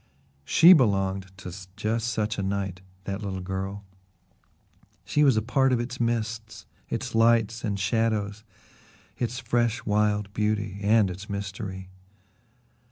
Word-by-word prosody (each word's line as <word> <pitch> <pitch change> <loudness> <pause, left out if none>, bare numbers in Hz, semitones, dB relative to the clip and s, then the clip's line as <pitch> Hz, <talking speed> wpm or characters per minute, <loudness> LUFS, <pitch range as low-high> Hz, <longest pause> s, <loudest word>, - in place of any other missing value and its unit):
She 165 - +8
belonged 95 - +2
to 90 -2 -8 0.2
just 110 +2 -1
such 110 -2 -1
a - - +1
night 95 -2 -2 0.2
that 100 +1 -4
little 95 -2 -4
girl 95 +2 -5 1.2
she 150 - +2
was 135 -6 +5
a 110 - +1
part 130 +3 +2
of 125 - +2
its 125 +1 -5
mists, 110 -2 -2 0.2
its - - -3
lights 115 0 +3
and 100 -3 -2
shadows, 105 0 0 0.8
its 120 0 -2
fresh 120 -1 0
wild 105 -1 +1
beauty 105 -2 -1
and 105 -1 +3
its 95 +3 -9
mystery. 95 -2 -5
105 Hz, 130 wpm, -26 LUFS, 100-115 Hz, 1.2 s, She